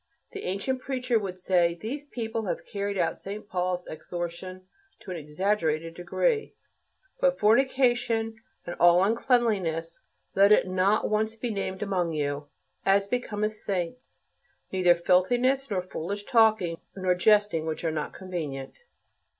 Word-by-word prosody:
The 405 -4 -7
ancient 255 +8 -2
preacher 255 -4 0
would 190 -3 -5
say, 175 -2 +2
"These 275 - -5
people 225 -4 -4
have - - -3
carried 200 0 -3
out 175 - 0
St. 205 +2 -7
Paul's 180 -1 -1
exhortation 175 +3 -6 0.4
to 190 - -8
an 180 - -4
exaggerated 165 0 -1
degree: 435 - -1 0.6
'But - - +3
fornication 240 -1 +2 0.3
and 175 - -5
all 175 +1 +6
uncleanness, 200 -8 +1 0.3
let 200 +1 +5
it 210 - +5
not 185 +3 +2
once 220 +1 0
be 230 +1 -3
named 195 -1 -3
among 180 -5 -1
you, 145 -1 -2 0.4
as 195 +1 +3
becometh 215 -1 -2
saints; 200 +3 -4 0.5
neither 180 -2 +4
filthiness 245 +10 +2
nor 190 -4 -1
foolish 195 +3 -5
talking 215 -8 +3 0.2
nor 185 -2 +1
jesting 205 -3 +3
which 160 +1 -3
are 165 - +1
not 155 -1 -3
convenient.'" 155 -8 -6
195 Hz, 135 wpm, -27 LUFS, 175-225 Hz, 0.6 s, all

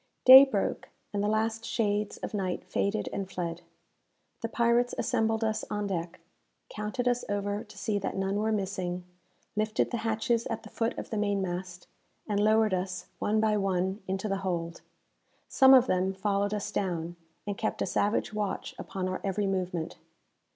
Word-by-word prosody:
Day 265 +2 +12
broke, 270 - -2 0.2
and 200 - 0
the - - +1
last 220 +1 0
shades 210 -3 -1
of - - -6
night 190 -3 -2
faded 200 +3 -1
and 195 -1 -3
fled. 175 -2 -4 0.8
The 230 - -2
pirates 235 +1 +2
assembled 225 -2 +1
us 220 -1 0
on 210 0 -2
deck, 175 -2 -3 0.5
counted 215 +4 -3
us 245 0 +1
over 205 0 -1
to - - -16
see 205 -2 -1
that 195 - -3
none 195 +1 0
were 215 +1 +1
missing, 185 -3 -2 0.5
lifted 215 +1 0
the 240 - -1
hatches 225 +1 0
at 225 -2 -4
the 215 - -11
foot 230 0 -1
of - - -6
the 220 - -1
mainmast, 185 -3 -2 0.4
and 205 -2 0
lowered 215 0 +4
us, 185 -1 -2
one 215 +1 +1
by 215 -1 +2
one, 190 0 0
into 195 +2 -2
the 195 -1 0
hold. 170 -3 -3 0.7
Some 265 -1 +7
of 255 -1 +6
them 190 -2 0
followed 200 +1 0
us 205 - -4
down, 175 -3 -2 0.3
and 205 -1 -2
kept 215 - -2
a - - 0
savage 210 +1 0
watch 210 -2 -3
upon 185 -1 -4
our 185 0 -3
every 200 +1 0
movement. 180 -4 -2
205 Hz, 170 wpm, -29 LUFS, 190-220 Hz, 0.8 s, Day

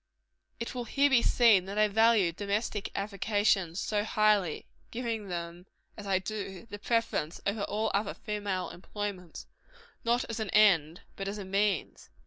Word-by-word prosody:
It 235 - -4
will 245 -2 -4
here 285 +3 +2
be 250 -3 +5
seen 225 -7 +4
that 200 +2 -6
I 215 0 +5
value 220 -3 +4
domestic 205 +3 -2
avocations 200 -3 0
so 210 -1 0
highly 210 -6 +2 0.2
giving 230 -3 -3
them, 175 0 -6 0.3
as 205 -2 -9
I 195 -1 +3
do, 195 0 -5
the 205 - -6
preference 220 -8 -1
over 200 +1 -1
all 215 +1 -1
other 200 +2 -1
female 205 -4 -3
employments 185 -2 -6 0.6
not 235 +1 +2
as 230 - -5
an 215 -2 -3
end, 180 -6 +4
but 195 - -5
as 200 +1 -4
a 200 - -6
means. 195 -1 -1
205 Hz, 155 wpm, -30 LUFS, 190-220 Hz, 0.6 s, be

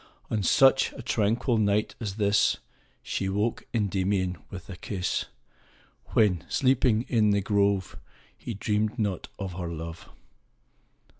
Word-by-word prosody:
On 110 - +1
such 135 +7 +5
a 130 - -9
tranquil 115 +1 +1
night 105 0 +1
as 105 -4 -4
this, 105 -1 +3
io - - -19 0.4
She 95 - -2
woke 105 +4 -1
Kndymion 95 -4 0
with 95 -2 -9
a 95 - -7
kis^, 90 0 -2 0.9
When, 95 -7 +3
sleeping 125 -4 +3
in 110 -5 +2
tin 100 -1 +1
grove, 100 -2 +1 0.4
He 115 - -6
dreamed 105 +3 -1
not 100 -6 -2
of 95 -2 -5
her 90 -1 -4
love. 85 0 -7
100 Hz, 135 wpm, -27 LUFS, 95-110 Hz, 0.9 s, such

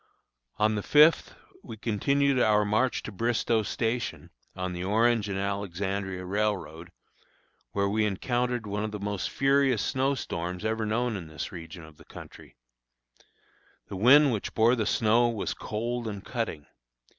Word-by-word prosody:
On 105 +1 +2
the 105 - -2
fifth 150 +8 +4 0.3
we 110 - -9
continued 135 +5 +1
on - - +4
our 105 -1 +3
march 110 +5 0
to - - -6
Bristoe 115 +1 0
Station, 115 +3 -3 0.2
on 90 -1 -4
the 90 0 -5
Orange 110 +2 +2
and 95 - -2
Alexandria 95 -1 -3
Railroad, 95 -4 -2 0.8
where 100 0 +1
we 110 +2 +1
encountered 120 +3 -1
one 105 +1 -3
of 110 - -2
the 105 0 -6
most 100 -1 -3
furious 135 -6 +2
snow 135 +2 0
storms 90 -4 -5
ever 110 0 -1
known 120 +1 0
in 90 -5 -6
this 80 0 -6
region 85 0 -9
of 80 -1 -17
country. - - -13 1.3
The - - -6
wind 135 +7 +6
which 105 - -4
bore 115 +2 +4
the 110 -4 -1
snow 115 +2 +3
was 110 -4 -3
cold 120 +2 -4
and 100 -2 -6
cutting. 110 - -4
105 Hz, 155 wpm, -27 LUFS, 100-120 Hz, 1.3 s, wind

